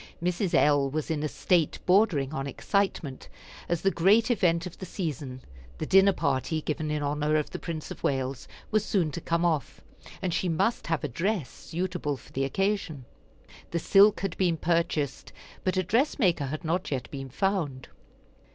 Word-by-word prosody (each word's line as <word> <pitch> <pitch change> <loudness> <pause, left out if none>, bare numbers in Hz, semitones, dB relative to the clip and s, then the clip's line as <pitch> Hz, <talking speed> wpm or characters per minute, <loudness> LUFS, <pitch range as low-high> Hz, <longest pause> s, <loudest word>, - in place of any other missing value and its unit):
Mrs. 180 +2 0
L. 145 -2 +4
was 155 +3 -3
in 155 -2 -1
a 155 - 0
state 155 +3 +1
bordering 180 -8 +3
on 135 -1 -3
excitement, 165 -2 -2 0.4
as 170 -2 -1
the 195 - +4
great 210 +8 +4
event 175 -7 +2
of 180 - -9
the 185 - -5
season, 145 - -5 0.3
the - - -3
dinner 195 +1 +6
party 150 -2 0
given 155 0 -2
in 150 -1 -1
honor 150 +1 0
of 150 -1 0
the - - -5
Prince 160 -3 -5
of - - -8
Wales, 135 -1 -1 0.2
was 215 -1 +2
soon 180 -7 +1
to 170 - -5
come 170 +2 0
off, 145 -5 -1 0.4
and 185 -3 -2
she 180 - 0
must 195 +8 0
have 165 -3 -1
a - - 0
dress 170 - -1
suitable 175 -4 -3
for - - -18
the 135 +1 0
occasion. 185 -4 -1 0.6
The 170 - -2
silk 200 +5 +5
had 195 -3 -2
been 175 -3 +2
purchased, 160 -4 -1 0.3
but 185 0 0
a 185 - +2
dress 230 - +1
maker 175 - +2
had 155 +3 -5
not 175 +4 -1
yet 130 -4 -3
been 135 -2 -6
found. 150 -4 -1
165 Hz, 180 wpm, -28 LUFS, 145-185 Hz, 0.6 s, dinner